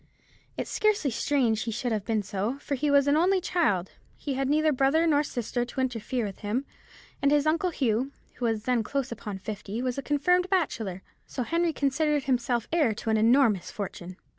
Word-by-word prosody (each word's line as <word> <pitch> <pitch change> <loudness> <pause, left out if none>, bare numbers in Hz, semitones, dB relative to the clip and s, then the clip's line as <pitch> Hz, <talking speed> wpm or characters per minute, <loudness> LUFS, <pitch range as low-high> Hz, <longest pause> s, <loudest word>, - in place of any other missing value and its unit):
It's - - -4
scarcely 420 -10 +1
strange 235 -3 +1
he 230 - -2
should 240 +2 -2
have 210 -3 -1
been 220 -2 0
so, 205 +6 -2
for 285 - -5
he 290 +2 0
was 280 -1 +5
an 285 - +4
only 370 +4 +3
child; 300 - 0 0.3
he 285 - -3
had 270 0 -1
neither 310 +1 +3
brother 275 +4 +3
nor 295 -3 +4
sister 245 -3 -2
to 245 +2 -6
interfere 245 -1 -1
with 195 -2 -7
him; 225 +6 -2 0.6
and 280 - +4
his 290 0 +3
uncle 330 +4 +2
Hugh, 255 -4 0 0.3
who 245 - -2
was 225 -2 0
then 245 -1 +1
close 270 +3 -2
upon 210 -3 -5
fifty, 205 +2 -6
was 255 +1 -2
a - - -2
confirmed 360 +6 +2
bachelor,—so 235 - -3
Henry 335 +5 +1
considered 295 0 +1
himself 245 -3 0
heir 295 -11 +3
to 225 - -3
an 220 - +3
enormous 225 -3 +3
fortune." 185 -3 -6
260 Hz, 190 wpm, -27 LUFS, 220-295 Hz, 0.6 s, was